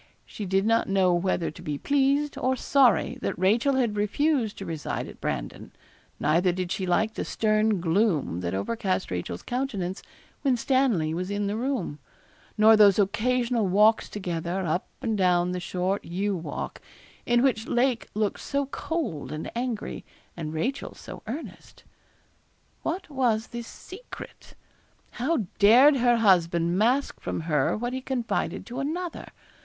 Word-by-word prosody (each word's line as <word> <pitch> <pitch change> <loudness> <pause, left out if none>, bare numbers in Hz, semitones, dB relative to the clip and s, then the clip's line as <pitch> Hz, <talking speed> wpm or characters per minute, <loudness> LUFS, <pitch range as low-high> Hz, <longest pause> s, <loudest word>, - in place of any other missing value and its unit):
She 205 - -7
did 195 +2 +1
not 225 -1 +2
know 190 -2 +3
whether 175 -1 0
to - - -13
be 150 -1 -3
pleased 280 - +1
or 260 +1 0
sorry 265 -1 +3
that - - -2
Rachel 225 +9 +3
had 240 -5 +1
refused 225 +3 0
to 195 - -6
reside 160 -3 -4
at - - -12
Brandon; - - -4 0.5
neither 170 +5 +3
did 180 0 -3
she 190 - -2
like 220 +5 +1
the - - -3
stern 215 -2 +1
gloom 170 - +1
that 90 +1 -2
overcast 190 - -2
Rachel's 90 -1 -4
countenance 210 -8 -3 0.4
when 265 -4 +2
Stanley 235 - +1
was 180 +3 -3
in 205 0 -1
the 200 +1 -1
room, 235 - -2 0.6
nor 220 +1 +7
those 205 -3 +6
occasional 235 +2 +1
walks 210 +4 +4
together, 180 -1 -3
up 170 +3 -1 0.2
and 225 -2 0
down 180 -1 +3
the 180 - -2
short 180 +2 -2
yew 195 +4 -2
walk, 160 -4 -5 0.5
in 240 +1 +3
which 235 -4 +1
Lake 245 -1 +1
looked 210 -1 0
so 280 0 -1
cold 280 - -4
and 155 +1 -5
angry, 240 -2 -3 0.3
and 155 -3 -5
Rachel 240 +13 -3
so - - -10
earnest. 275 +9 -8 1.0
What 360 +4 -3
was 245 -6 0
this 235 -1 -6
secret? 405 +7 -11 0.6
How 255 -2 -1
dared 255 +8 +7
her 240 -1 +3
husband 175 -5 +3
mask 245 +8 +1
from - - -3
her 150 -1 +1
what 240 +3 -3
he 260 - -3
confided 255 -3 -2
to 245 +2 -6
another? 330 +5 -4
215 Hz, 150 wpm, -26 LUFS, 180-250 Hz, 1.0 s, nor